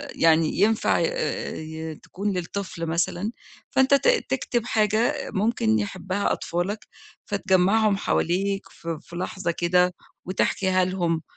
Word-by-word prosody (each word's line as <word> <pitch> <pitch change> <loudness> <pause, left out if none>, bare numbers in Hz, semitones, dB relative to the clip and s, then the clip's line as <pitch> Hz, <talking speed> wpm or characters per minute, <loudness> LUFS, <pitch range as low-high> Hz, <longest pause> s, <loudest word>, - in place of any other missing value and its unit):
يعني 165 0 +3
ينفع 215 +2 +3
آآ - - -2
ي 160 0 -6
تكون 200 +7 -4
للطفل 180 -1 -4
مثلًا، 175 +5 -1 0.4
فأنت 265 +1 +4
ت 280 - +4 0.2
تكتب 245 -3 -1
حاجة 220 0 +1
ممكن 190 - +2
يحبها 185 - -2
أطفالك، 185 +5 -3 0.4
فتجمّعهم 200 +2 +3
حواليك 195 +1 0
ف - - -15
في 165 +1 -5
لحظة 185 0 -2
كده 180 +1 +2 0.3
وتحكيها 185 0 +1
لهم 175 -3 0
185 Hz, 115 wpm, -25 LUFS, 170-210 Hz, 0.4 s, فأنت